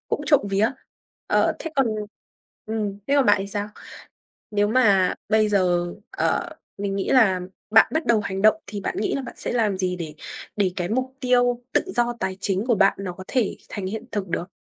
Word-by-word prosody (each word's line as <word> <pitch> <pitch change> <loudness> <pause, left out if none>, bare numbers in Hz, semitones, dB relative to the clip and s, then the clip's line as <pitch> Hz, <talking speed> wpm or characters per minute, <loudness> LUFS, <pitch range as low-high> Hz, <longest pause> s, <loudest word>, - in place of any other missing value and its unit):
cũng - - -1
trộm 290 - +5
vía. 205 +4 +2 0.6
Ờ, - - +3
thế 325 - -5
còn 270 -3 +4 0.8
ừm, 210 -2 -3
thế 280 - +2
còn 275 - +4
bạn 205 - +6
thì 195 - -3
sao? 205 +1 -2 0.8
Nếu 205 0 +2
mà 205 -6 +4 0.2
bây 215 0 +4
giờ, 175 -3 +1 0.2
ờ, - - 0 0.3
mình 200 -1 -2
nghĩ 195 - -2
là 220 -9 +4 0.3
bạn 220 +1 +7
bắt 315 0 0
đầu 235 -2 +4
hành 195 -1 -3
động 215 -1 +6
thì 205 0 -5
bạn - - -3
nghĩ 210 - 0
là 275 - -2
bạn 255 - -9
sẽ - - -2
làm 220 -5 +1
gì 185 -1 -1
để 160 -4 -6 0.4
để 200 -3 +1
cái 175 -2 -2
mục 255 +3 -1
tiêu 245 -1 +2
tự - - +4
do 240 0 +2
tài 190 0 -2
chính 195 +1 0
của 245 -2 +3
bạn 195 -1 +4
nó 185 -2 -4
có 185 +1 -10
thể 245 -6 0
thành 195 -2 -5
hiện 215 +3 -4
thực 205 -2 -2
được? 175 +2 -3
205 Hz, 210 wpm, -23 LUFS, 190-235 Hz, 0.8 s, bạn